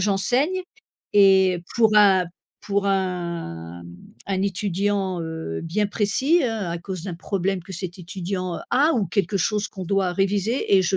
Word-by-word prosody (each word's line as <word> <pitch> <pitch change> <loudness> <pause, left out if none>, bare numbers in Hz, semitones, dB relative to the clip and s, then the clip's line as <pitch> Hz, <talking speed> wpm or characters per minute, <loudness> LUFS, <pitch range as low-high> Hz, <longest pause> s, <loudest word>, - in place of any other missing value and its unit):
j'enseigne. 250 - +1 0.5
Et 190 -3 +5
pour 220 -2 +4
un 195 -3 +6 0.4
pour 200 0 -1
un, 170 - -3
mmh, 85 0 -11 0.3
un 190 -1 -1
étudiant, 195 -1 -1
heu, 160 - -5
bien 205 +6 0
précis, 260 +11 +2
hein, 220 -6 -2
à 170 - -2
cause 185 -1 -6
d'un 185 - -4
problème 190 +1 -2
que 190 +2 -10
cet 180 +1 -5
étudiant 180 0 -4
a, 290 +5 +4
ou 215 -6 +1
quelque 200 +3 0
chose 210 +3 0
qu'on 190 -2 -7
doit 190 -1 +1
réviser 200 +4 +1
et 190 - +4
je 185 +1 +1
195 Hz, 160 wpm, -23 LUFS, 180-205 Hz, 0.5 s, un